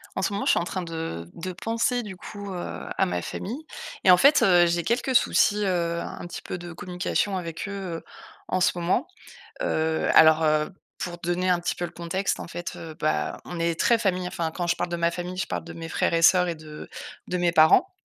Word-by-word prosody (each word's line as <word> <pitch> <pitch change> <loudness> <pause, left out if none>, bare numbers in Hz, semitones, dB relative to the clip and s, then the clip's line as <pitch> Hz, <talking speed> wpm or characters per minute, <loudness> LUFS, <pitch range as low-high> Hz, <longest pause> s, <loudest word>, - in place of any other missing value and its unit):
En - - -1
ce 195 - 0
moment, 200 - -2
je - - +5
suis - - +3
en - - -1
train 185 0 -3
de 160 - -5
de 185 +2 -5
penser, 230 +5 0
du 190 -4 -8
coup, 205 0 -8
heu, 175 - -5
à - - +3
ma 90 0 -2
famille 255 - -6 0.4
et 185 - +7
en 180 - +8
fait, 280 +8 +6
heu, 175 -2 +6
j'ai 170 0 0
quelques 245 +6 0
soucis, 210 -3 +4
heu, 170 -3 0
un - - -7
petit 175 - -7
peu - - -5
de 175 0 -8
communication 185 +2 -1
avec 170 +2 -5
eux, - - -5 0.3
heu, - - -11 0.5
en 185 - +1
ce 175 - +2
moment, 180 - 0 0.6
heu, 160 - 0
alors, 160 0 +7
heu, 155 0 +2 0.3
pour 175 -1 -5
donner 175 +2 0
un 180 - +3
petit 175 - -1
peu 175 - -4
le - - -4
contexte, 180 +3 -2
en - - -7
fait, 175 +1 -6
heu, 160 -1 -8
bah, 75 -1 -1
on 175 - -6
est 170 0 0
très 235 - +4
famille. 185 -4 0
Enfin, 170 -2 -2
quand 175 +2 -3
je 170 - +1
parle 175 - -2
de 175 - -1
ma 170 0 +2
famille, 175 +1 -5
je 185 - -1
parle - - -4
de - - -8
mes 165 -1 -7
frères - - +1
et 165 - +2
sœurs 180 +1 +6
et 170 - -1
de 155 -1 -10 0.4
de 180 - -1
mes 175 -1 +2
parents. 160 - +6
175 Hz, 240 wpm, -25 LUFS, 165-190 Hz, 0.6 s, en